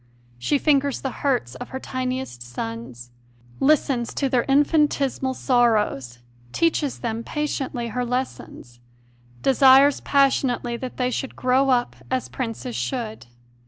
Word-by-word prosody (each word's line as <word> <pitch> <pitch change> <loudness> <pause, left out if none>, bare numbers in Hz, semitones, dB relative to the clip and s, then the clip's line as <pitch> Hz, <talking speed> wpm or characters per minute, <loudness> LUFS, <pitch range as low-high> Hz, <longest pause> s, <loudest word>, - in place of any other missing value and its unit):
She 285 - +1
fingers 280 -2 +2
the 265 - -3
hurts 250 - 0
of 130 - -8
her 260 - -5
tiniest 255 - -4
sons, 120 0 -7 0.5
listens 270 -4 +2
to 275 - 0
their 250 -2 +1
infinitesi 290 -1 +2
mal 260 -1 -1
sorrows, 215 - +1 0.3
teaches 310 - 0
them 230 -1 -3
patiently 270 -6 -3
their 250 +2 -1
lessons, 245 - -5 0.6
desires 270 +1 +6
passionately 265 -3 +1
that 250 +1 -7
they 250 -1 0
should 270 - -4
grow 260 +2 +2
up 245 -2 +1
as 260 -1 -2
princes 245 0 -5
should. 220 - -4
255 Hz, 125 wpm, -23 LUFS, 230-275 Hz, 0.6 s, desires